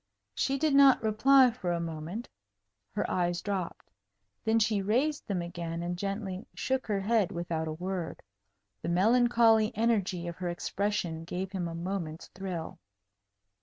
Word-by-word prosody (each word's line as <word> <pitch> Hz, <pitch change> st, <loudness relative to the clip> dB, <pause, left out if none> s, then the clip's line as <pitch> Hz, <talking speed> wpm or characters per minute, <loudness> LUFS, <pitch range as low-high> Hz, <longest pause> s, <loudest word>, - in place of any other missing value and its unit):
She 270 Hz, -, 0 dB
did 305 Hz, +1 st, +1 dB
not 275 Hz, -3 st, +6 dB
reply 250 Hz, +4 st, +5 dB
for 190 Hz, -7 st, -3 dB
a 170 Hz, -, 0 dB
moment. 165 Hz, +6 st, -5 dB, 0.7 s
Her 210 Hz, -, 0 dB
eyes 175 Hz, -1 st, 0 dB
dropped. 195 Hz, -4 st, -4 dB, 0.5 s
Then 220 Hz, 0 st, +3 dB
she 215 Hz, -2 st, +2 dB
raised 260 Hz, +10 st, 0 dB
them 185 Hz, -4 st, -1 dB
again, 170 Hz, -1 st, -5 dB
and 175 Hz, +1 st, -2 dB
gently 195 Hz, 0 st, -4 dB
shook 265 Hz, 0 st, -1 dB
her 205 Hz, -2 st, 0 dB
head 215 Hz, -2 st, +2 dB
without 170 Hz, -2 st, -3 dB
a 155 Hz, -, -3 dB
word. 180 Hz, 0 st, -4 dB, 0.6 s
The -, -, -3 dB
melancholy 225 Hz, +3 st, +4 dB
energy 200 Hz, -6 st, +1 dB
of 170 Hz, -, -6 dB
her 180 Hz, -1 st, -3 dB
expression 175 Hz, -2 st, -2 dB
gave 185 Hz, +3 st, -4 dB
him 185 Hz, -3 st, -2 dB
a 165 Hz, -, -5 dB
moment's 170 Hz, -2 st, -4 dB
thrill. 180 Hz, -4 st, -6 dB
190 Hz, 150 wpm, -30 LUFS, 175-225 Hz, 0.7 s, not